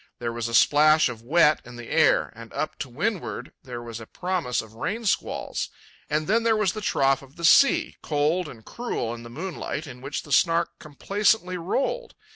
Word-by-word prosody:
There 115 -1 -3
was 120 -1 -3
a 115 - -1
splash 155 +3 +5
of 115 -2 -7
wet 150 +4 +4
in 125 0 -12
the 120 -1 -9
air, 160 -1 +3
and 115 0 -11
up 155 - -2
to 145 -4 -4
windward 185 - -3
there 125 -4 -7
was 115 -1 -7
a 115 - -10
promise 180 -9 -2
of 110 -1 -7
rain 205 - -3
squalls; 200 - -1 0.4
and 155 +1 0
then 220 +6 +2
there 225 -1 +2
was 200 -4 +1
the 215 - -5
trough 135 -7 +2
of 135 0 -16
the 170 - -3
sea, 315 - +5
cold 155 +3 0
and 110 -2 -13
cruel 235 - -3
in 120 - -8
the 120 - -10
moonlight, 155 +1 -5
in 125 -3 -10
which 140 +2 -4
the 145 - -12
Snark 170 +4 +3
complacently 190 +5 0
rolled. 270 - -2
155 Hz, 200 wpm, -25 LUFS, 120-185 Hz, 0.4 s, splash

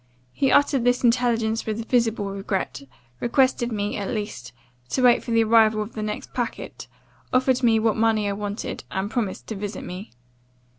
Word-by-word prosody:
He 270 - +1
uttered 285 -3 +4
this 245 +1 +2
intelligence 230 -2 +1
with 220 +1 -3
visible 225 -5 +1
regret; 195 -8 -3 0.4
requested 245 -1 +2
me, 205 -1 -2
at 200 -2 -3
least, 205 - -5 0.4
to 255 - 0
wait 245 -1 +5
for - - -9
the 230 -1 +4
arrival 220 -1 +4
of 210 - -11
the 215 - -5
next 210 0 -5
packet; 245 -1 -4 0.4
offered 255 0 +2
me 230 -3 +4
what 220 -1 +2
money 220 -2 +2
I 200 - 0
wanted, 205 +1 -5
and 195 +2 -3
promised 220 -6 -2
to 220 - -3
visit 205 0 -5
me. 185 +4 -8
225 Hz, 170 wpm, -24 LUFS, 205-240 Hz, 0.4 s, wait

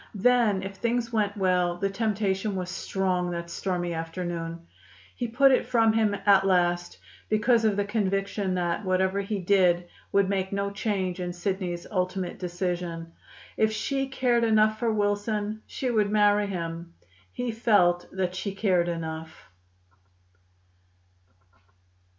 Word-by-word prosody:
Then 215 -2 +3
if 195 0 -7
things 235 +1 -1
went 210 -1 0
well 180 -2 +1
the 195 +2 -1
temptation 205 -1 -1
was 180 -1 -3
strong 180 -1 -1
that 170 -1 -5
stormy 175 -2 -2
afternoon. 165 0 -5 0.5
He 245 - -2
put 270 +4 +4
it 260 - +2
from 225 -2 +3
him 215 -2 +2
at 195 -1 +6
last, 175 -2 +1 0.3
because 225 +2 +3
of 210 -2 +3
the 205 - +1
conviction 195 -2 -1
that 175 +3 -1
whatever 190 +1 +1
he 200 +1 -3
did 180 -2 +2 0.2
would 200 -1 +3
make 190 -1 -1
no 200 0 -1
change 195 -3 -2
in 180 -1 -3
Sidney's 180 -1 -3
ultimate 185 -1 -2
decision. 175 -2 -3 0.5
If 220 0 +3
she 270 +5 -1
cared 250 -3 +1
enough 215 -1 +3
for 230 -1 +1
Wilson, 210 +1 -1
she 255 -2 -2
would 210 -3 +2
marry 205 -1 +3
him. 170 -2 -5 0.4
He 245 -1 -3
felt 200 -6 +3
that 185 -1 -2
she 195 +2 -4
cared 185 -4 +2
enough. 160 - -6
195 Hz, 140 wpm, -27 LUFS, 180-215 Hz, 0.5 s, at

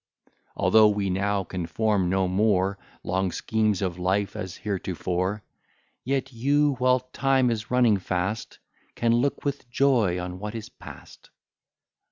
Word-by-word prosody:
Although 110 -1 +5
we 100 -2 0
now 100 +1 0
can 90 -2 -5
form 100 +1 +1
no 95 0 +1
more 100 0 +1 0.2
Long 95 +1 -1
schemes 110 -2 0
of 90 -2 -3
life, 95 +3 0
as 95 -2 -5
heretofore; 95 0 -2 0.6
Yet 135 0 -2
you, 145 +5 +2
while 125 0 +3
time 130 0 +1
is 110 -1 -4
running 120 -4 +4
fast, 95 +3 -3 0.4
Can 115 -1 +2
look 130 +6 0
with 140 -3 -3
joy 120 -9 +2
on 90 0 -6
what 105 +2 -5
is 110 -2 -6
past. - - -13
105 Hz, 140 wpm, -25 LUFS, 95-120 Hz, 0.6 s, Although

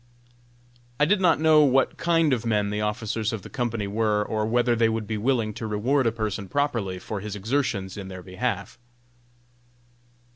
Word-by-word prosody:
I 150 - +5
did 190 +4 +2
not 170 -4 +4
know 155 -1 +6
what 135 -2 +3
kind 165 -3 +2
of 120 -3 -1
men 105 -3 0
the 105 0 -2
officers 110 0 -2
of 110 -4 -5
the - - -11
company 115 -5 -2
were, 105 0 0
or 110 -1 -1
whether 120 +1 +2
they 115 -1 +3
would 110 -1 -2
be 110 - -3
willing 115 -2 0
to 110 +1 -5
reward 120 +5 +1
a - - +2
person 105 -3 -4
properly 120 -10 -1
for 100 +3 -5
his 105 +1 -6
exertions 105 -4 -2
in 100 -2 -6
their 95 -1 -8
behalf. 100 +3 -4
110 Hz, 180 wpm, -25 LUFS, 105-125 Hz, -, know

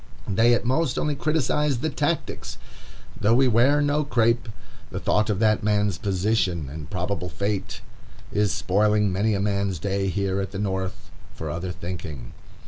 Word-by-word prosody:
They 115 +4 +4
at 120 - -2
most 130 +1 +1
only 150 - 0
criticise 150 -1 +1
the 155 +6 -2
tactics. - - -2 0.6
Though 110 +3 +4
we 130 +1 +5
wear 130 +5 +4
no 145 +1 +2
crape, 115 -3 +1 0.4
the - - -4
thought 110 +1 +1
of 105 - +1
that 110 0 +3
man's 105 -1 +1
position 95 -6 0
and 75 -1 -8
probable 90 0 -2
fate 100 +4 -3 0.5
is 105 -1 +1
spoiling 105 +2 +2
many 105 +3 +1
a - - -1
man's 100 -2 0
day 95 +4 -1
here 95 0 0
at 95 - -3
the - - -4
North 95 -2 -3 0.2
for 80 -2 -5
other 85 +3 -4
thinking. 85 -8 -7
105 Hz, 160 wpm, -24 LUFS, 95-120 Hz, 0.6 s, we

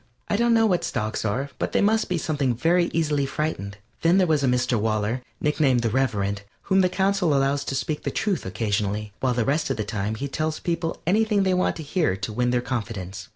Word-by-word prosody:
I - - +2
don't 235 +2 +3
know 225 0 +4
what 185 -5 +2
stocks 110 +1 -2
are, 130 +7 -1
but - - -2
they - - +3
must 220 +2 +2
be 180 - 0
something 140 -6 0
very 170 +7 +2
easily 150 -4 +1
frightened. 120 -10 -3 0.2
Then 170 +3 +4
there 190 - +4
was 155 -4 +1
a - - +3
Mr. 125 -1 +1
Waller, 110 +3 0 0.2
nicknamed 145 -5 +2
the 115 - +1
Reverend, 100 -6 0 0.2
whom 190 -1 +3
the 185 - +3
Council 190 -4 +1
allows 140 +1 +1
to 135 - -3
speak 150 +3 -2
the - - -2
truth 200 -7 -1
occasionally, 105 +1 -2
while 125 -2 +1
the 120 -2 +1
rest 150 +2 0
of 135 - -1
the 110 - -1
time 105 +1 -3
he 140 +6 -4
tells 155 +3 -2
people 170 -1 -3
anything 210 +2 +2
they 190 -1 +2
want 180 0 +1
to 160 - -6
hear 150 - 0
to 105 +3 -5
win 125 +2 +1
their 120 0 +1
confidence. 105 -6 -5
140 Hz, 225 wpm, -24 LUFS, 110-170 Hz, 0.2 s, know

